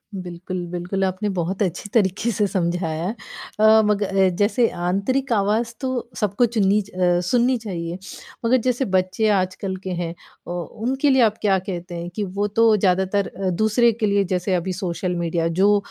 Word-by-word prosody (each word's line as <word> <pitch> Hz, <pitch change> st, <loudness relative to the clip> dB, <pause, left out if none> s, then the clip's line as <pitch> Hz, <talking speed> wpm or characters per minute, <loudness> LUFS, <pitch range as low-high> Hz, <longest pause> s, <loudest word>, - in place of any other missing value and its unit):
बिल्कुल, 180 Hz, 0 st, -5 dB
बिल्कुल 180 Hz, +2 st, -2 dB
आपने 190 Hz, +2 st, -1 dB
बहुत 180 Hz, +4 st, -2 dB
अच्छी 185 Hz, +2 st, -3 dB
तरीक़े 210 Hz, +1 st, +2 dB
से 210 Hz, 0 st, +1 dB
समझाया 170 Hz, -3 st, -1 dB
है। 210 Hz, +5 st, -2 dB, 0.4 s
अ, 220 Hz, 0 st, +7 dB
मग 210 Hz, 0 st, +1 dB
अ, 195 Hz, -1 st, +2 dB
जैसे 230 Hz, +5 st, +2 dB
आंतरिक 200 Hz, +10 st, -1 dB
आवाज़ 220 Hz, +3 st, +1 dB
तो 255 Hz, -3 st, -3 dB
सबको 210 Hz, +3 st, +2 dB
चुननी 210 Hz, -3 st, +2 dB
च 200 Hz, -, -13 dB
अ, 180 Hz, -2 st, +1 dB
सुननी 250 Hz, +1 st, +3 dB
चाहिए, 175 Hz, -6 st, -5 dB, 0.5 s
मगर 255 Hz, +3 st, +4 dB
जैसे 250 Hz, +1 st, +1 dB
बच्चे 190 Hz, +2 st, +1 dB
आजकल 190 Hz, -1 st, 0 dB
के 190 Hz, -, -4 dB
हैं, 165 Hz, -1 st, -3 dB, 0.3 s
ओ 175 Hz, 0 st, -3 dB, 0.3 s
उनके 270 Hz, +3 st, +1 dB
लिए 265 Hz, -1 st, +4 dB
आप 220 Hz, -2 st, +3 dB
क्या 195 Hz, -3 st, +3 dB
कहते 180 Hz, -1 st, -6 dB
हैं, 170 Hz, +1 st, -5 dB
कि 215 Hz, -, -1 dB
वो 200 Hz, +2 st, -2 dB
तो 225 Hz, +1 st, +4 dB
ज़्यादातर 190 Hz, +1 st, +1 dB
अ, 190 Hz, 0 st, -3 dB
दूसरे 220 Hz, +6 st, +3 dB
के 220 Hz, 0 st, -1 dB
लिए 200 Hz, -1 st, +2 dB
जैसे 180 Hz, +1 st, 0 dB
अभी 180 Hz, +1 st, -2 dB
सोशल 180 Hz, -1 st, -3 dB
मीडिया 170 Hz, -1 st, -1 dB
जो 205 Hz, +1 st, +5 dB
195 Hz, 180 wpm, -22 LUFS, 180-220 Hz, 0.5 s, अ